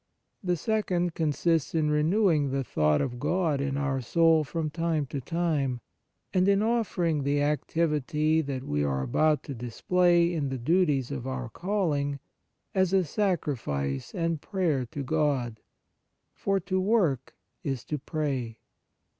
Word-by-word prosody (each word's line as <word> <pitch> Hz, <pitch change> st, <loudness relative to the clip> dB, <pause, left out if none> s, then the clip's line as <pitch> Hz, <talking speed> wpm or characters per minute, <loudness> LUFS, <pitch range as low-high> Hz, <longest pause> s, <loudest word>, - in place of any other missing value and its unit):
The 180 Hz, -1 st, +1 dB
second 180 Hz, -3 st, 0 dB
consists 165 Hz, 0 st, 0 dB
in 155 Hz, -2 st, +2 dB
re 150 Hz, 0 st, +2 dB
newing 165 Hz, -4 st, +3 dB
the 135 Hz, 0 st, -1 dB
thought 75 Hz, -9 st, +2 dB
of 120 Hz, -2 st, -3 dB
God 155 Hz, -1 st, +1 dB
in 140 Hz, 0 st, -1 dB
our 140 Hz, -2 st, -1 dB
soul 165 Hz, +5 st, +4 dB
from 155 Hz, +1 st, -3 dB
time 165 Hz, -2 st, 0 dB
to 140 Hz, +1 st, -5 dB
time, 150 Hz, -5 st, -1 dB, 0.5 s
and 185 Hz, 0 st, +3 dB
in 200 Hz, +1 st, +4 dB
offer 225 Hz, -5 st, 0 dB
ing 160 Hz, -3 st, +1 dB
the 145 Hz, +1 st, +1 dB
activity 150 Hz, +1 st, +1 dB
that 135 Hz, -3 st, -4 dB
we 75 Hz, -, -1 dB
are 65 Hz, -2 st, 0 dB
about 150 Hz, -, +2 dB
to 140 Hz, -, -6 dB
display 170 Hz, +8 st, +2 dB
in 145 Hz, -5 st, -1 dB
the 130 Hz, -, -3 dB
duties 145 Hz, -1 st, +1 dB
of 130 Hz, -2 st, -4 dB
our 130 Hz, -2 st, -4 dB
calling 150 Hz, -, -1 dB, 0.5 s
as 190 Hz, -1 st, +2 dB
a 190 Hz, -1 st, +4 dB
sacrifice 130 Hz, -, -2 dB
and 165 Hz, -3 st, -1 dB
prayer 165 Hz, -, 0 dB
to 140 Hz, +4 st, -5 dB
God. 135 Hz, -6 st, 0 dB, 0.7 s
For 195 Hz, -1 st, 0 dB
to 185 Hz, +1 st, -1 dB
work 185 Hz, -, +1 dB, 0.3 s
is 135 Hz, -4 st, -3 dB
to 150 Hz, -, -3 dB
pray. 135 Hz, -6 st, -3 dB
150 Hz, 150 wpm, -28 LUFS, 135-175 Hz, 0.7 s, soul